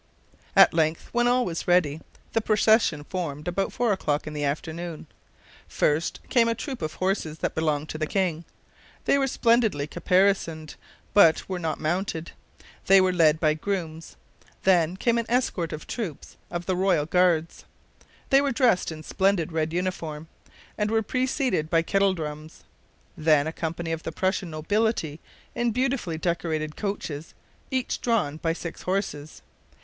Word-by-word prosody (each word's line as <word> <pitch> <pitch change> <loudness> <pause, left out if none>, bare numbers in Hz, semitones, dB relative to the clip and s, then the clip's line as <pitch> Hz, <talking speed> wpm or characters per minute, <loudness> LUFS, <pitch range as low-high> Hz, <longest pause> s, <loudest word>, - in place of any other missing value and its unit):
At - - +7
length, 160 0 0
when 240 0 +2
all 250 0 +3
was 165 -2 -4
ready, 160 -4 +2 0.3
the 225 - +2
procession 215 -7 +3
formed 150 -4 -5
about 195 +2 -1
four 235 -3 +1
o'clock 150 -6 -1
in 155 - -6
the 150 -1 -3
afternoon. 160 +3 -4 0.6
First 150 +2 0
came 235 -2 +3
a 230 - +1
troop 260 0 -6
of 155 -1 -4
horses 185 -5 -1
that - - -2
belonged 155 -2 -1
to 155 - -5
the 155 - -1
king. 175 -4 -1 0.6
They 280 - +3
were 270 - +2
splendidly 230 - +2
caparisoned, 175 -2 +1 0.4
but 170 -5 +5
were 185 -2 -3
not 160 -2 -2
mounted. 170 0 -2 0.6
They 195 0 +8
were 185 -1 +3
led 160 -3 +4
by 155 -2 +3
grooms. 165 -2 -4 0.5
Then 180 -2 +3
came 235 +3 +2
an 230 - -3
escort 230 -9 0
of 155 - -6
troops 195 - -6
of 175 0 -4
the 185 - 0
Royal 185 -5 +2
Guards. 170 -1 +1 0.7
They 275 0 +6
were 280 -1 0
dressed 230 -8 +2
in 155 -1 -8
splendid 190 -1 +1
red 160 0 -1
uniform, 165 -3 -3 0.5
and 210 0 +1
were 220 0 +1
preceded 255 - 0
by 165 -1 +3
kettle 195 +1 +2
drums. 155 -1 -7 0.5
Then 155 -2 +3
a 160 - -3
company 165 0 -4
of 165 0 -2
the 165 - -5
Prussian 185 +1 -1
nobility 160 -1 -1 0.3
in 240 0 0
beautifully 245 -8 -1
decorated 160 -2 -2
coaches, 165 -7 -5 0.3
each 260 -1 -2
drawn 215 -11 0
by 165 0 -1
six 170 0 -7
horses. 180 - -3
175 Hz, 155 wpm, -26 LUFS, 155-205 Hz, 0.7 s, They